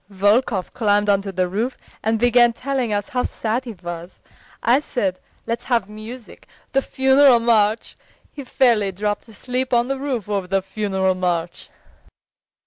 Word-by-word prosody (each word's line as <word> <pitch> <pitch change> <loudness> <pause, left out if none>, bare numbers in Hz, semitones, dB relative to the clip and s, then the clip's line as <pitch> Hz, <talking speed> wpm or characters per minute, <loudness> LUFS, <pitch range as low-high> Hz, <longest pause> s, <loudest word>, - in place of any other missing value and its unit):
"Volkov 205 +1 +1
climbed 205 -2 +2
onto 200 0 +1
the 185 -1 0
roof 220 +8 -2 0.2
and 225 +1 +1
began 240 +1 +4
telling 255 -2 -2
us 205 +6 -2
how 255 -4 0
sad 235 +2 -2
he 235 - -6
was. 175 +1 -7 0.4
I 240 +4 +4
said: 195 -10 -2 0.3
'Let's 230 +1 -3
have 235 -6 +1
music, 215 +3 -11 0.2
the 270 - +2
funeral 265 -1 +4
march!' 220 -2 +2 0.4
He 285 - -8
fairly 235 -6 +2
dropped 205 +4 -3
asleep 250 +3 -2
on 240 +2 +2
the 270 -1 -2
roof 260 -7 -3
over 200 -3 -2
the 195 0 0
funeral 190 -1 -1
march." 175 -2 -3
220 Hz, 150 wpm, -21 LUFS, 195-250 Hz, 0.4 s, began